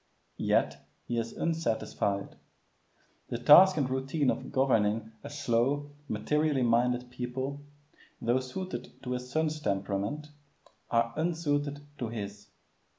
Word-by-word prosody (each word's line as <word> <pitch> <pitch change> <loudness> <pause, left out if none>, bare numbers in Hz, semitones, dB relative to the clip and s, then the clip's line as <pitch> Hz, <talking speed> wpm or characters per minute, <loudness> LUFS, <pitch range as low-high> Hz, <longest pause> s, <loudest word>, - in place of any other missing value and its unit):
Yet - - +1 0.2
he 120 -1 -1
is 115 0 -4
unsatisfied. 115 -10 -1 0.9
The - - -3
task 170 +10 +8
and 140 -4 +2
routine 135 +2 +1
of 130 - -5
governing 115 -5 +2
a 145 - -6
slow, 140 +1 0 0.2
materially 145 +5 +1
minded 125 +1 +2
people, 130 +3 -4 0.6
though 120 +3 +2
suited 130 0 -6
to 125 - -4
his 125 0 -3
son's 155 +2 0
temperament, 100 +7 -2 0.6
are 115 0 +2
unsuited 145 -3 -1
to 120 - -2
his. 105 -2 -6
130 Hz, 115 wpm, -30 LUFS, 115-145 Hz, 0.9 s, task